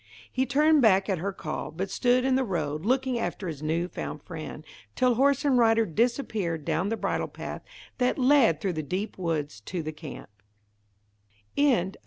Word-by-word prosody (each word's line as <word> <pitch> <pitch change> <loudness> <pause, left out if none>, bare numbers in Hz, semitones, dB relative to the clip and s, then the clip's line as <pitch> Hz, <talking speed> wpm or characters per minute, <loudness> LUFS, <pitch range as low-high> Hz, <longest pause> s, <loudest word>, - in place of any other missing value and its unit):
He 260 0 0
turned 300 +3 +4
back 195 -3 +4
at 190 -4 0
her 200 +4 -2
call, 155 -4 -5
but 190 +4 -4
stood 250 +2 +2
in 265 - +2
the 260 +1 +3
road, 160 - -2
looking 260 -1 +1
after 200 -4 -3
his 155 -4 -5
new 165 +3 0
found - - -6
friend, 160 -2 -8 0.3
till 250 -1 +3
horse 275 +3 +2
and 265 -3 +4
rider 225 -1 +4
disappeared 205 - -1
down 165 +4 0
the 225 - -1
bridle - - -1
path - - -7 0.4
that 250 0 +2
led 255 - +4
through 190 0 -1
the 155 - -2
deep 185 +8 -4
woods 150 - -2
to 170 - -4
the 155 - -4
other 155 0 -9 1.4
camp. 190 -9 +2
195 Hz, 180 wpm, -27 LUFS, 160-250 Hz, 1.4 s, turned